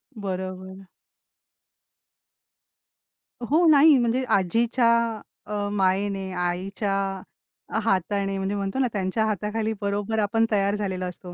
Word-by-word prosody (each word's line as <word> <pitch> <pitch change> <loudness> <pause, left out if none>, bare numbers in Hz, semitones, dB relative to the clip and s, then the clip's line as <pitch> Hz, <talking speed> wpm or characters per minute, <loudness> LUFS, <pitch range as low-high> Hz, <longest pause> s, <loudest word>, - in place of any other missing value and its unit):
बरोबर. 190 -1 -6 2.6
हो 315 +8 +3
नाही 295 0 +7
म्हणजे 240 +2 +1
आजीच्या 230 +6 +2 0.6
अ, 205 -1 -2
मायेनी, 195 0 0
आईच्या 185 +3 -2 0.9
हातानी, 195 -1 0
म्हणजे 195 +1 -2
म्हणतो 200 +4 -3
ना 260 - +3
त्यांच्या 200 +2 0
हाताखाली 215 +1 -2
बरोबर 205 +2 -1
आपण 220 +2 +2
तयार 200 -1 +2
झालेलो 190 -3 -3
असतो. 180 0 -8
200 Hz, 100 wpm, -24 LUFS, 190-220 Hz, 2.6 s, नाही